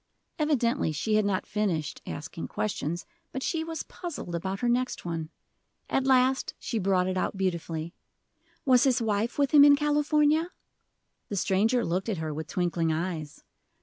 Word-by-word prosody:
Evidently 275 - +1
she 185 +9 -1
had 215 -1 +3
not 195 -2 0
finished 180 -8 -2
asking 160 +3 -6
questions, 175 -5 -3 0.3
but 265 - -4
she 325 -2 -1
was 325 0 -4
puzzled 335 - -7
about 190 +3 -3
her 245 - +1
next 250 -2 0
one. 165 -2 -3 0.6
At 270 0 +1
last 260 0 +3
she 230 - -3
brought 185 -2 +2
it 185 0 -1
out 190 - -1
beautifully: 170 -3 -2 0.7
"Was 255 -2 +5
his 260 -2 +3
wife 220 0 -1
with 280 -2 +2
him 290 -2 +8
in 290 0 +8
California?" 295 +2 +2 0.8
The 205 - -3
stranger 215 +6 +2
looked 185 +6 -1
at 205 - -1
her 160 -1 -3
with 155 +1 -5
twinkling 170 -2 0
eyes. 160 -2 -4
210 Hz, 160 wpm, -28 LUFS, 170-265 Hz, 0.8 s, him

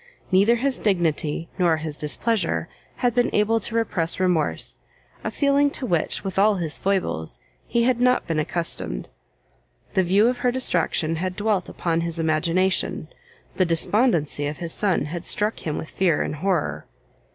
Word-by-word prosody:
Neither 200 +5 +5
his 265 +2 0
dignity 165 -5 0
nor 170 -3 +3
his 155 -1 -4
displeasure 170 +4 -1 0.3
had 245 -2 0
been 245 0 +2
able 215 +2 +3
to 225 - -5
repress 185 -8 +1
remorse, 180 -5 0 0.5
a - - -1
feeling 285 0 +2
to 260 - -4
which, 170 -8 0
with 190 0 -2
all 210 +1 +4
his 165 -5 -2
foibles, 80 - -1 0.3
he 235 -1 +1
had 245 0 +1
not 250 0 +3
been 165 -2 -1
accustomed. 155 - -2 0.8
The 190 - +3
view 195 +5 +3
of 245 0 0
her 245 - +2
distraction 165 -9 0
had 185 +2 -3
dwelt 205 -3 0
upon 165 -1 -1
his 170 0 -1
imagination, 165 +4 0 0.5
the 185 - +4
despondency 165 - +1
of 145 +1 -5
his 170 -2 -2
son 195 -7 +1
had 165 +3 -5
struck 210 +3 +1
him 150 - -2
with 160 - -6
fear 175 -5 +1
and 150 - -4
horror. 150 - -1
180 Hz, 165 wpm, -23 LUFS, 160-220 Hz, 0.8 s, Neither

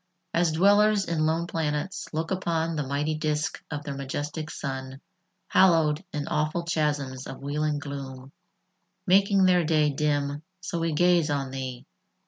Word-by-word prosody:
As 170 -1 +2
dwellers 205 +3 +4
in 155 -2 0
lone 165 +2 0
planets 160 +3 -3
look 160 +2 -3
upon 165 -3 -1
The 150 - -1
mighty 145 +3 -1
disk 155 0 -2
of 145 -1 -4
their 145 - -4
majestic 145 +3 -4
sun, 135 -2 -5 0.5
Hallowed 165 -3 +4
in 150 -1 -3
awful 155 +3 0
chasms 145 -5 -1
of 135 - -9
wheeling 150 +1 -1
gloom, 135 -2 -7 0.7
Making 195 +1 +4
their 180 -1 +4
day 155 -2 +2
dim, 145 0 -1 0.2
so 180 -2 -4
we 165 -1 0
gaze 175 0 +3
on 140 -2 -1
thee. 130 -2 -5
155 Hz, 145 wpm, -26 LUFS, 145-170 Hz, 0.7 s, dwellers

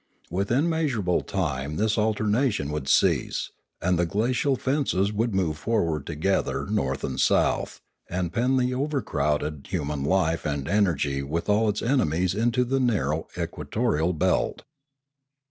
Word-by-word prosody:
Within 110 - +1
measurable 135 - 0
time 75 -6 -2
this 105 +3 +1
alternation 110 - +1
would 75 -3 -4
cease, - - +2 0.3
and 90 0 +1
the 85 - +3
glacial 120 - +1
fences 130 -8 0
would 110 0 0
move 80 -5 0
forward 80 -9 0
together 85 +5 0
north 65 0 -1
and 65 0 -3
south, - - +2 0.3
and 90 -1 -2
pen 125 +3 +2
the 125 0 +1
overcrowded 75 - -1
human 75 -6 -2
life 80 0 +1
and 70 -2 -2
energy 80 -9 +1
with 75 +5 -3
all 105 +1 +3
its 105 - -2
ene 125 - +2
mies 90 +4 0
into 115 +4 +1
the 135 +2 0
narrow 80 - 0
equatorial 85 - -1
belt. 90 +1 0
95 Hz, 140 wpm, -25 LUFS, 75-115 Hz, 0.3 s, the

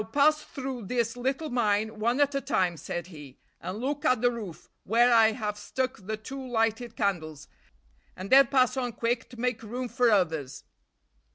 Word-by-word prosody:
"Now, 210 - -7
pass 300 +5 +3
through 260 -7 -6
this 235 0 -1
little 265 +5 -2
mine 220 -2 0
one 235 +5 +1
at 285 0 +3
a 275 - -1
time," 180 -7 0
said 170 +2 -5
he, 145 -4 -12 0.2
"and 185 +2 -5
look 285 +5 -3
at 255 -6 +3
the 245 +1 +3
roof, 210 -9 -8 0.2
where 240 +3 +4
I 225 -1 +6
have 210 -2 -4
stuck 260 +4 -3
the 215 0 -2
two 265 +5 -8
lighted 225 -1 -1
candles, 155 -8 -2 0.7
and 185 +2 -8
then 275 +1 +8
pass 255 -2 +3
on 245 -2 -2
quick 230 +1 -2
to 245 - -12
make 245 -1 -1
room 245 +3 -4
for 245 +1 +2
others." 160 - 0
235 Hz, 185 wpm, -28 LUFS, 210-255 Hz, 0.7 s, then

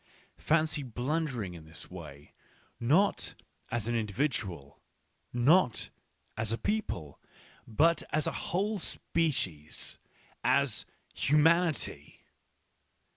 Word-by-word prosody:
Fancy 155 -1 +2
blundering 125 - -2
in 80 -2 -10
this 80 +3 -11
way, 75 -5 -10 0.5
not 155 +12 +2 0.3
as 115 -2 -2
an 120 - 0
individual, 105 - -2 0.5
not 125 - +3 0.4
as 110 0 -1
a 115 - 0
people, 90 - -2 0.5
but 160 +9 +3
as 155 -1 +2
a - - +1
whole 205 +4 0
species! 110 - -1 0.4
as - - +2 0.3
humanity 150 - +2
125 Hz, 90 wpm, -31 LUFS, -, 0.5 s, not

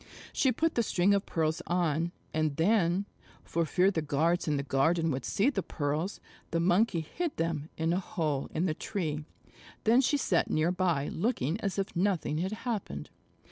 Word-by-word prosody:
She 265 - +3
put 325 +7 +1
the 235 - +2
string 195 -2 +2
of 200 0 0
pearls 160 -1 0
on, 170 -1 +1 0.2
and 155 -2 0
then, 180 +2 +2 0.4
for 165 -1 -1
fear 185 +5 +3
the 165 - -1
guards 160 +4 +1
in 150 -1 +1
the 140 - -1
garden 160 +5 +2
would 130 -1 -2
see 230 +8 +2
the 200 - -1
pearls, 155 +4 -2 0.3
the 165 - 0
Monkey 180 +1 +3
hid 330 - -4
them 165 -2 -1
in 165 +1 +1
a 180 - +1
hole 155 -7 -2
in 165 +3 0
the 165 - +1
tree. 155 -5 -3 0.6
Then 235 +4 +5
she 290 +3 +2
sat 185 -10 +1
near 155 +3 +2
by 175 -6 0
looking 180 - -1
as 195 -1 -2
if 195 -1 -2
nothing 175 -4 +1
had 185 +3 -1
happened. 230 -5 -3
170 Hz, 180 wpm, -30 LUFS, 155-195 Hz, 0.6 s, Then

